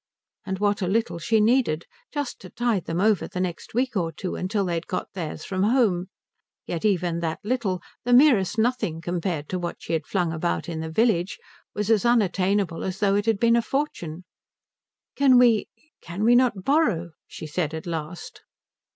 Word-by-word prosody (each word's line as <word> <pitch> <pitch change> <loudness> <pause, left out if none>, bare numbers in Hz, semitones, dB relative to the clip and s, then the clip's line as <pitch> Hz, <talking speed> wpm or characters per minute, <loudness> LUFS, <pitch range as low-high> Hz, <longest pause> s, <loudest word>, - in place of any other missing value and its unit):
And 190 0 -2
what 205 +1 +1
a 185 - 0
little 215 -2 0
she 225 +5 +2
needed: 220 -8 +2 0.3
just 290 -4 -4
to 185 - -10
tide 230 -3 -1
them 165 +1 -2
over 210 0 +2
the 180 - -6
next 180 +3 -4
week 250 0 0
or 170 -4 0
two 185 +2 -5
till 200 0 0
they 175 - -1
had 165 0 -3
got 185 - -4
theirs 165 -4 -5
from 185 -1 -3
home; 205 -5 +2 0.6
yet 170 - -4
even 180 -5 +1
that 165 -1 -2
little, 210 -6 -1 0.2
the 245 - -1
merest 245 - +5
nothing 225 -8 0
compared 170 -3 -3
to 185 - -2
what 175 -1 -3
she - - -6
had 160 -2 -1
flung 175 -4 0
about 170 +2 -2
in 165 -2 -4
the 160 0 -4
village, 190 -1 +1 0.4
was 210 +1 0
as 215 -3 +3
unattainable 200 -6 +1
as 190 0 -3
though 195 -1 +2
it 205 +2 0
had 225 -2 +3
been 235 +1 +4
a 235 - +3
fortune. 185 - -3 0.9
"Can 270 -2 +5
we 235 -3 +4 0.3
can 175 +5 -5
we 235 +2 +5
not 245 -6 +3
borrow?" 220 - +1 0.2
she - - -8
said 155 0 -2
at 160 - -6
last. 165 0 -6
190 Hz, 190 wpm, -25 LUFS, 170-230 Hz, 0.9 s, merest